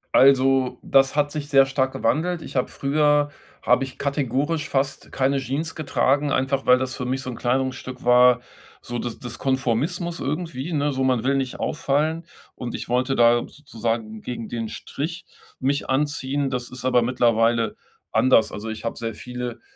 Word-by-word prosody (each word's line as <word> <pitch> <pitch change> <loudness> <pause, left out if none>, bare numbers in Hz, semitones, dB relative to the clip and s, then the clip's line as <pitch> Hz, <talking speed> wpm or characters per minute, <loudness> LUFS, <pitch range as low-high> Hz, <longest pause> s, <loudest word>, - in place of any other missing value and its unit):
Also, 135 -1 +4
das 135 +1 +3
hat 145 -1 +1
sich 150 -1 -5
sehr 135 -1 +6
stark 135 -1 0
gewandelt. 170 +4 0
Ich - - -10
habe 125 - +1
früher 145 +1 +2 0.3
habe 125 +2 +3
ich 130 - -11
kategorisch 140 +2 -1
fast 135 0 -2
keine 135 +1 +1
Jeans 140 +5 -3
getragen, 145 -1 +1
einfach 135 +1 0
weil 125 0 +7
das 130 0 -3
für 125 - -4
mich 130 +1 -1
so 130 - -5
'n - - -7
Kleidungsstück 130 +1 -2
war, 125 0 +6 0.4
so 120 0 -5
des 120 -2 -4
des 120 0 -7
Konformismus 140 - -1
irgendwie, 155 0 -3
ne, 145 0 +1
so 130 -1 -1
„man 125 -3 +2
will 135 +1 +2
nicht 130 -2 -2
auffallen“. 155 +2 0 0.3
Und 120 -2 -5
ich - - -6
wollte 130 +2 +1
da 120 0 +5
sozusagen 115 -6 -4
gegen 115 -2 -6
den 115 -2 -4
Strich 165 - -5 0.3
mich 140 +2 -1
anziehen. 140 0 0
Das 125 -1 -3
ist 125 0 -8
aber 125 -1 +4
mittlerweile 115 -1 +2 0.4
anders. 130 -3 +4
Also, 105 +2 -6
ich 110 +1 -6
habe 115 - -2
sehr 115 -2 -4
viele 125 -2 -6
130 Hz, 175 wpm, -23 LUFS, 125-145 Hz, 0.4 s, weil